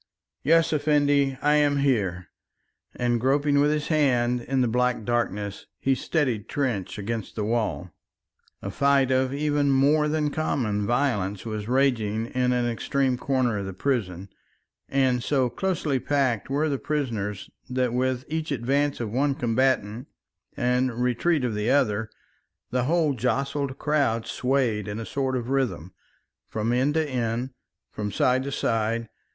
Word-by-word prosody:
"Yes, 165 +2 +3
Effendi, 145 -2 +2
I 150 +1 +4
am 145 -1 +3
here," 100 -10 0 0.7
and 120 -1 0
groping 140 +2 +2
with 145 +1 +4
his 150 0 -1
hand 125 -6 +2
in 130 +2 0
the 125 - +2
black 125 0 +1
darkness, 105 -4 -2
he 135 - +1
steadied 130 -5 -1
Trench 120 -11 -2
against 110 +1 -4
the 105 - -2
wall. 105 -5 -1 0.7
A 100 - -4
fight 140 +2 +3
of 130 0 +2
even 145 0 +1
more 145 +3 +3
than 150 -1 0
common 110 -10 -1
violence 115 -7 0
was 110 -2 -4
raging 115 -4 +1
in 125 +1 0
an 125 -1 +1
extreme 130 +2 0
corner 125 -4 0
of 100 - -4
the 95 - -7
prison, 100 -7 -2 0.6
and 130 -2 +2
so 130 -2 +1
closely 165 -7 -1
packed 130 -7 0
were 145 +3 +1
the 140 -3 -1
prisoners 115 -10 -3 0.2
that 125 -1 0
with 130 0 0
each 160 0 -3
advance 140 +3 0
of 115 -3 -3
one 135 +3 +1
combatant 120 -2 0 0.5
and 125 -1 0
retreat 125 +5 +1
of 120 - -1
the 105 +2 -1
other, 110 -6 +2 0.6
the 125 -1 0
whole 160 -1 +2
jostled 135 +2 -1
crowd 140 -7 +1
swayed 125 -5 0
in 105 +1 -4
a 115 - -5
sort 130 0 -1
of 120 +1 -4
rhythm, 125 - -1 0.5
from 110 +2 -1
end 135 +4 +1
to 160 -1 +1
end, 120 -1 -2 0.4
from 105 -1 -4
side 130 +4 +2
to 140 +1 -4
side. 115 -2 -1
130 Hz, 150 wpm, -25 LUFS, 115-140 Hz, 0.7 s, I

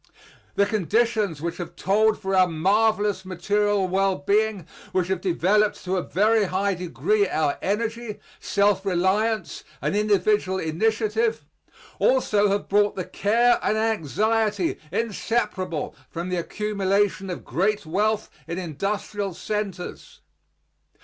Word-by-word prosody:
The 200 - +4
conditions 210 -3 0
which 170 +1 -3
have 175 - -7
told 215 +3 +2
for 195 -2 -3
our 185 -1 +5
marvelous 205 +4 +1
material 200 +2 0
well 195 +1 +1
being, 200 +3 0 0.3
which 185 -1 0
have 190 -2 -1
developed 200 +3 +1
to 185 +1 0
a 185 - +1
very 215 +4 +2
high 195 +2 0
degree 400 - 0
our 150 -2 0
energy, 225 +2 -2 0.2
self 200 -1 +1
reliance, 195 +2 0 0.2
and - - -1
individual 205 -2 +2
initiative, 220 +6 0 0.5
also 210 -6 +3
have 200 +1 -1
brought 205 +1 +2
the 185 - -3
care 235 +4 +2
and 215 - +1
anxiety 215 -1 0
inseparable 205 -5 -2 0.2
from 170 +2 -5
the 180 - -1
accumulation 200 +1 0
of 180 - -6
great 205 +3 0
wealth 210 +6 0 0.2
in 170 +1 -4
industrial 195 +3 -3
centers. 210 - -5
200 Hz, 125 wpm, -24 LUFS, 185-215 Hz, 0.5 s, our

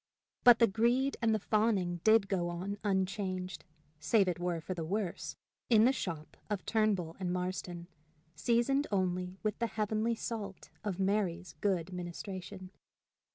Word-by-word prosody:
But 245 -2 +9
the 230 - +6
greed 240 +6 +2
and 230 -1 +3
the 220 - +3
fawning 205 -4 +1
did 220 -2 +5
go 180 -3 0
on 190 +4 -4
unchanged, 190 -2 -1 0.3
save 200 +4 +3
it 180 -1 -1
were 175 -1 -1
for 170 +4 -4
the 170 -2 -4
worse, 190 +2 -3 0.3
in 225 -2 +6
the 260 - +5
shop 165 - -5
of 205 -3 -2
Turnbull 205 -7 +1
and 180 -2 -1
Marston, 180 -1 -3 0.5
seasoned 240 - +2
only 185 -1 -1
with 215 -1 -1
the 235 - +1
heavenly 220 +1 0
salt 210 -4 -5
of 200 -3 -3
Mary's 190 -3 0
good 190 -3 0
ministration. 185 +1 -6
195 Hz, 150 wpm, -33 LUFS, 180-220 Hz, 0.5 s, But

